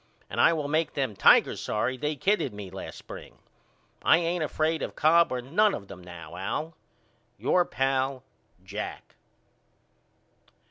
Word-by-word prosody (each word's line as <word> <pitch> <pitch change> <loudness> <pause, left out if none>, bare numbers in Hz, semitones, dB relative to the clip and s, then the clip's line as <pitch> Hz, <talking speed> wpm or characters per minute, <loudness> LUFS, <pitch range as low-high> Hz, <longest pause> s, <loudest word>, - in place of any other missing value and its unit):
And - - +1
I - - +6
will 155 -3 -1
make 155 +2 0
them 130 -7 -1
Tigers - - +5
sorry 120 +4 -1
they 150 +4 -2
kidded 195 - 0
me 100 -3 -8
last 95 - -8
spring. - - -11 0.6
I - - +5
ain't 170 0 0
afraid 155 +1 0
of - - -4
Cobb 165 +2 +4
or 125 -1 -2
none 200 - +3
of 100 - -9
them 90 -1 -10
now, 85 -2 -10
Al. 155 - -3 0.6
Your 180 -1 +2
pal, 135 0 -1 0.4
JACK. 100 +3 -7
135 Hz, 145 wpm, -27 LUFS, 105-160 Hz, 0.6 s, I